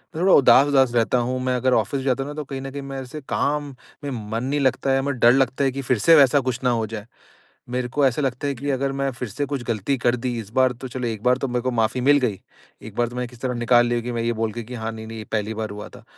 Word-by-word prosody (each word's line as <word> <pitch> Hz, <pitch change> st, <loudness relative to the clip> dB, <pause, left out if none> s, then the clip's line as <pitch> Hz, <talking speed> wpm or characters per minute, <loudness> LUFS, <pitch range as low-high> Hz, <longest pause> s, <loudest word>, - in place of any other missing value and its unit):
मैं 165 Hz, -, -3 dB
थोड़ा 190 Hz, -, +5 dB
उदास-उदास 135 Hz, -2 st, +5 dB
रहता 120 Hz, +2 st, +2 dB
हूँ, 125 Hz, +2 st, -1 dB
मैं 130 Hz, -1 st, 0 dB
अगर 125 Hz, +1 st, +1 dB
ऑफ़िस 125 Hz, +5 st, 0 dB
जाता 135 Hz, 0 st, 0 dB
हूँ 145 Hz, -, -7 dB
ना -, -, -6 dB
तो 150 Hz, -, -4 dB
कहीं 135 Hz, -1 st, -6 dB
न 135 Hz, 0 st, -6 dB
कहीं 140 Hz, 0 st, -6 dB
मेरे 135 Hz, -1 st, -6 dB
से 150 Hz, +4 st, -8 dB
काम 145 Hz, -1 st, -1 dB, 0.3 s
में 140 Hz, -, -3 dB, 0.2 s
मन 115 Hz, +2 st, -2 dB
नहीं 145 Hz, +3 st, -1 dB
लगता 135 Hz, 0 st, +1 dB
है, 135 Hz, 0 st, +2 dB
म 140 Hz, -, -2 dB
डर 120 Hz, -3 st, +5 dB
लगता 135 Hz, +1 st, +1 dB
है 135 Hz, -, +2 dB
कि 135 Hz, +1 st, -4 dB
फ़िर 125 Hz, -2 st, 0 dB
से 165 Hz, +8 st, +6 dB
वैसा 140 Hz, -1 st, +6 dB
कुछ 130 Hz, -1 st, -2 dB
ना 125 Hz, -, +3 dB
हो 115 Hz, -2 st, 0 dB
जाए। 105 Hz, -1 st, -7 dB, 0.6 s
मेरे 125 Hz, 0 st, -2 dB
को 145 Hz, +3 st, +1 dB
ऐसा 130 Hz, +3 st, +1 dB
लगता 135 Hz, +1 st, -2 dB
है 140 Hz, -, 0 dB
कि 140 Hz, +4 st, -4 dB
अगर 135 Hz, +1 st, -1 dB
मैं 140 Hz, 0 st, +1 dB
फ़िर 120 Hz, -2 st, -6 dB
से 145 Hz, +8 st, -3 dB
कुछ 140 Hz, -3 st, -4 dB
गलती 115 Hz, +4 st, -1 dB
कर 120 Hz, 0 st, +1 dB
दी 120 Hz, 0 st, -3 dB
इस 105 Hz, -3 st, -8 dB
बार 130 Hz, -1 st, +3 dB
तो 130 Hz, +2 st, -8 dB
चलो, 125 Hz, -1 st, -4 dB
1 110 Hz, -2 st, -5 dB
बार 125 Hz, 0 st, +3 dB
तो 135 Hz, -, -2 dB
मेरे 125 Hz, -1 st, -1 dB
को 130 Hz, -, 0 dB
माफ़ी 115 Hz, +2 st, 0 dB
मिल 145 Hz, +2 st, +5 dB
गई। 115 Hz, -7 st, -1 dB, 0.4 s
1 110 Hz, -1 st, -10 dB
बार 120 Hz, -1 st, +1 dB
तो 120 Hz, -, -9 dB
मैंने 125 Hz, 0 st, -2 dB
किसी 120 Hz, -1 st, -16 dB
तरह 130 Hz, -1 st, -1 dB
निकाल 120 Hz, 0 st, +3 dB
लिया 120 Hz, 0 st, 0 dB
कि 120 Hz, -, -5 dB
मैं 115 Hz, -1 st, -2 dB
ये 120 Hz, -, 0 dB
बोल 110 Hz, -1 st, -2 dB
के 120 Hz, -, -5 dB
कि 125 Hz, +3 st, -10 dB
हाँ 110 Hz, -, -2 dB
नहीं-नहीं 110 Hz, 0 st, -8 dB
ये 110 Hz, -, -6 dB
पहली 110 Hz, 0 st, -1 dB
बार 110 Hz, 0 st, -4 dB
हुआ 105 Hz, 0 st, -7 dB
था। -, -, -14 dB
125 Hz, 305 wpm, -23 LUFS, 120-135 Hz, 0.6 s, से